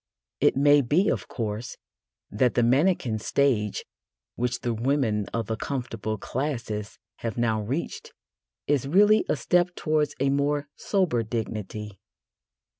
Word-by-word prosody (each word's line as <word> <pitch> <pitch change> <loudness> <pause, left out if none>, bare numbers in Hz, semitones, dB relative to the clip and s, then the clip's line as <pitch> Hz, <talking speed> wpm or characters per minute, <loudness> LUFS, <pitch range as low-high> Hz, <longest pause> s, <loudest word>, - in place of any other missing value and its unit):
It - - +3
may 145 +1 +6
be, 155 - +2
of - - -2
course, 110 0 -4 0.5
that 120 +4 +2
the 120 - +3
mannequin 130 -3 +2
stage 110 -3 0 0.5
which 125 +1 -2
the 120 - -1
women 115 -3 0
of 115 -1 -3
the 110 - -2
comfortable 115 -3 -4
classes 115 -5 -4 0.2
have 115 -1 -4
now 110 -2 +1
reached 130 +11 -4 0.5
is 140 -2 +1
really 205 +7 +5
a - - +3
step 180 0 +1
towards 155 -2 0
a 135 +1 +2
more 145 +1 0
sober 185 - +1
dignity. 105 -3 -5
125 Hz, 130 wpm, -26 LUFS, 110-145 Hz, 0.5 s, may